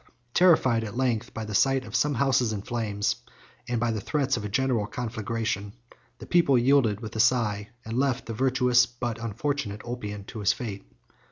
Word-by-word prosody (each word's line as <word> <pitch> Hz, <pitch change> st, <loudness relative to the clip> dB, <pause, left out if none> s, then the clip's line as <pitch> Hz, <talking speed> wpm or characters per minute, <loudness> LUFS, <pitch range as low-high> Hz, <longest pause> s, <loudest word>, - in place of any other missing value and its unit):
Terrified, 130 Hz, -10 st, +4 dB
at 110 Hz, +2 st, -6 dB
length, 120 Hz, -2 st, 0 dB
by 115 Hz, -, -5 dB
the 105 Hz, -, -6 dB
sight 135 Hz, +4 st, +3 dB
of 110 Hz, +1 st, -7 dB
some 145 Hz, +1 st, +2 dB
houses 130 Hz, -2 st, +2 dB
in 100 Hz, -2 st, -4 dB
flames, 105 Hz, -4 st, -1 dB, 0.5 s
and 120 Hz, -1 st, 0 dB
by 120 Hz, 0 st, +1 dB
the 110 Hz, -2 st, -3 dB
threats 135 Hz, +2 st, 0 dB
of -, -, -4 dB
a 105 Hz, -, -4 dB
general 125 Hz, -2 st, +1 dB
conflagration, 110 Hz, -3 st, -3 dB, 0.4 s
the -, -, -10 dB
people 170 Hz, -7 st, +4 dB
yielded 120 Hz, -4 st, +3 dB
with 110 Hz, -1 st, -7 dB
a -, -, -3 dB
sigh, 110 Hz, -3 st, +2 dB, 0.2 s
and 110 Hz, +1 st, -4 dB
left 135 Hz, -2 st, 0 dB
the 115 Hz, -, -5 dB
virtuous 125 Hz, 0 st, +3 dB
but 120 Hz, -1 st, -5 dB
unfortunate 115 Hz, -1 st, -3 dB
Ulpian 105 Hz, -4 st, -5 dB
to 110 Hz, -, -8 dB
his 100 Hz, -, +3 dB
fate. 105 Hz, -, -6 dB
120 Hz, 185 wpm, -27 LUFS, 110-130 Hz, 0.5 s, Terrified